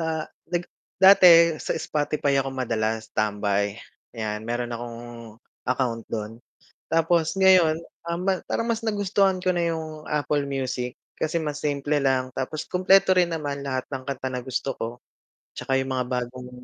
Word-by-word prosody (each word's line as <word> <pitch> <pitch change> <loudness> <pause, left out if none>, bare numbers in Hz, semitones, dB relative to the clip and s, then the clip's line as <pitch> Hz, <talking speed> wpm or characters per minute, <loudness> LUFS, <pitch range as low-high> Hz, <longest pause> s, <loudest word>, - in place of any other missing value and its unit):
sa 160 -1 -1 0.2
nag 175 0 -1 0.3
dati 175 -3 +8
sa - - -2
Spotify 145 -2 0
ako 135 - -3
madalas 110 -3 -2
tambay, 100 -1 0 0.4
'yan 105 -1 -3
meron 120 0 -2
akong 120 0 -6 0.7
account 125 -3 0
dun 110 +1 -5 0.5
tapos 165 +1 +2
ngayon, 185 -4 +6 0.3
ah, 170 - -1 0.3
parang 230 - -1
mas 230 0 0
nagustuhan 200 -2 +1
ko 185 - +3
na 170 -1 0
yung 155 -1 -7
Apple 150 -1 0
Music 130 -2 -3 0.2
kasi 155 +1 0
mas 150 -1 -4
simple 145 0 0
lang, 130 -1 +1
tapos 135 +4 -4
kumpleto 185 +1 +4
rin 180 -1 +4
naman 145 -3 -3
lahat 130 -2 -2
ng 130 -1 -3
kanta 130 -1 -3
na 125 - -2
gusto 130 +1 -2
ko. 115 - -3 0.7
'Tsaka 135 0 0
yung 130 0 -3
mga 130 - 0
bagong 125 0 -4
140 Hz, 150 wpm, -25 LUFS, 125-165 Hz, 0.7 s, dati